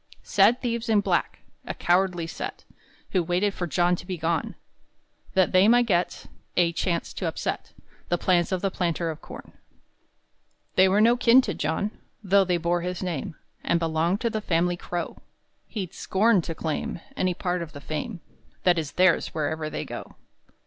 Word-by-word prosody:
Sad 210 +6 +4
thieves 235 -1 -2
in 215 -2 +4
black, - - -1 0.3
A - - -4
cowardly 175 -1 +1
set, 165 - -6 0.5
Who 185 - +2
waited 180 +4 0
for 175 - -3
John 175 +2 +2
to - - -9
be 185 -2 -3
gone, 165 0 -1 0.8
That 185 -1 +4
they 185 +2 +5
might 240 +1 +5
get 180 -5 0 0.3
A 170 -1 +3
chance 170 0 -1
to - - -3
upset - - -3 0.4
The 175 - +2
plans 175 0 +2
of 185 0 -1
the 195 - +1
planter 170 -2 -1
of 155 - -10
corn. - - -11 1.2
They 190 0 +5
were 200 +3 +3
no 235 +2 +6
kin 245 +1 +6
to 205 -6 -3
John, 160 +8 -1 0.3
Though 195 0 +4
they 180 -1 +1
bore 170 +1 0
his 180 +1 -4
name 165 -4 -3 0.3
And 170 - +2
belonged 165 +4 0
to 235 - 0
the 215 -1 -2
family 175 -2 +1
Crow; 175 0 -5 0.5
He'd 195 -5 -5
scorn 205 0 +2
to 165 - -4
claim 160 +1 -3 0.2
Any 185 -1 0
part 180 -1 -2
of 160 -2 -7
the 145 - -8
fame 165 +6 -5 0.4
That 175 -2 +4
is 150 -3 -5
theirs 180 -3 +3
wherever 155 0 -1
you - - -4
go. - - -8
180 Hz, 175 wpm, -26 LUFS, 170-195 Hz, 1.2 s, no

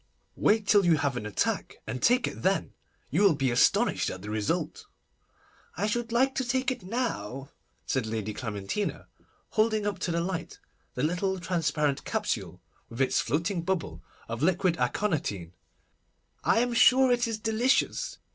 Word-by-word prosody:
Wait 215 0 +2
till 205 -1 +5
you 170 -3 +4
have 140 -3 0
an 105 -3 -4
attack, 105 - -1
and 130 - -5
take 250 +2 +3
it - - -7
then. - - 0 0.4
You - - +2
will 195 -6 +5
be 135 -3 0
astonished 120 - +3
at 95 - -7
the 105 - -5
result.' 110 -1 -2 0.9
'I 200 - 0
should 230 +2 -2
like 260 +3 +3
to 265 - -1
take 260 +2 0
it 250 - -5
now,' 140 - -3 0.3
said 130 -4 -1
Lady 110 -1 -3
Clementina, 105 - -3 0.4
holding 215 -1 +1
up 205 -1 -2
to 175 - -2
the 170 - 0
light 175 0 -4 0.4
the 125 - -2
little 180 +4 0
transparent 150 -5 0
capsule, - - -3 0.3
with 115 - -9
its 135 - +2
floating 170 - -1
bubble 180 0 -3 0.3
of 115 +2 -5
liquid 180 +1 +2
aconitine. 105 - -1 0.9
I 230 - +3
am 245 0 0
sure 255 +2 +6
it 245 0 +2
is 225 -2 -2
delicious. 225 +4 +1
180 Hz, 160 wpm, -28 LUFS, 130-220 Hz, 0.9 s, sure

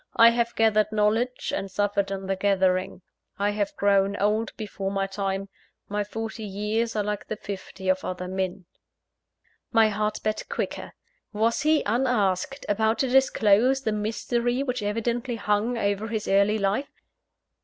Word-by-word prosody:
I 230 0 +8
have 235 0 -1
gathered 215 -1 +3
knowledge, 220 +4 0
and 195 - -4
suffered 200 0 0
in 195 -1 -4
the 195 0 0
gathering. 190 -2 +1 0.3
I 205 +1 +1
have 205 -1 -2
grown 200 0 +2
old 215 +2 +1
before 200 -2 -4
my 195 0 -1
time 195 0 -3 0.4
my 205 0 -1
forty 225 +2 -6
years 215 +3 -2
are 210 - +1
like 210 0 -3
the 215 - -3
fifty 195 -1 -7
of 185 0 +2
other 180 0 -4
men 185 -1 -3 0.5
" - - -58 0.3
My 220 -1 +5
heart 210 0 -1
beat 215 0 -2
quicker - - -4 0.4
was 225 +2 +1
he, 310 0 +3
unasked, 235 +1 0
about 220 +2 +1
to 265 - 0
disclose 255 -1 +4
the 220 - -1
mystery 235 +4 -1
which 250 -3 -2
evidently 235 +4 -1
hung 215 +2 0
over 205 0 -1
his 220 -1 -3
early 200 +2 +3
life? 205 +7 -2
210 Hz, 155 wpm, -26 LUFS, 195-230 Hz, 0.5 s, I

